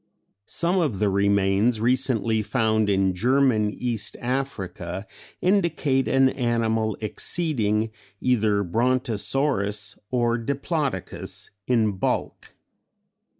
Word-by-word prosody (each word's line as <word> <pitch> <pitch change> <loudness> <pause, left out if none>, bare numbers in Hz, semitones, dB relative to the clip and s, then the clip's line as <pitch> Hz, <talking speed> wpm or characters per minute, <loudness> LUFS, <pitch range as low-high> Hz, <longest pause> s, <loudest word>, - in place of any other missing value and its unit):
Some 175 +3 +1
of 150 - 0
the 105 +1 +2
remains 100 +3 +2
recently 115 -2 +1
found 110 -2 +1
in 95 -1 +2
German 120 +1 +2
East 110 -1 -3
Africa 105 -8 -3 0.4
indicate 165 -8 +2
an 135 0 +4
animal 115 -4 0
exceeding 110 - 0 0.3
either 110 -5 +2
Brontosaurus 115 - 0
or 120 -1 +1
Diplodocus 140 - -3 0.2
in 110 -5 +2
bulk. - - -3
115 Hz, 90 wpm, -24 LUFS, 105-130 Hz, 0.4 s, an